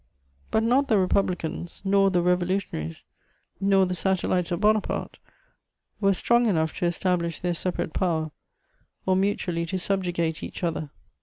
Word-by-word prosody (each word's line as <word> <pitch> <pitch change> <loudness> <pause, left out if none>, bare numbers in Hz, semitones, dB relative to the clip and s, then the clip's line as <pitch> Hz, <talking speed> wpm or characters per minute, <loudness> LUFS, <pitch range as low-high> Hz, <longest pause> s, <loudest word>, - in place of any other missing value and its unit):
But 220 - +2
not 260 +5 +3
the 220 -5 +3
Republicans, 180 -3 -1
nor 195 0 +4
the 180 -2 +1
Revolutionaries, 180 - -1 0.6
nor 195 -1 +4
the 180 - -2
satellites 185 -1 0
of 175 - -1
Bonaparte 215 0 0 0.8
were 195 -2 +3
strong 240 +4 +3
enough 160 -6 +1
to 175 - +2
establish 170 -1 -1
their 175 -1 -1
separate 170 -1 -3
power, 160 -4 0 0.7
or 185 - +3
mutually 185 -3 0
to 190 +2 -2
subjugate 175 -4 -1
each - - -7
other. 160 -3 -2
185 Hz, 140 wpm, -26 LUFS, 170-195 Hz, 0.8 s, nor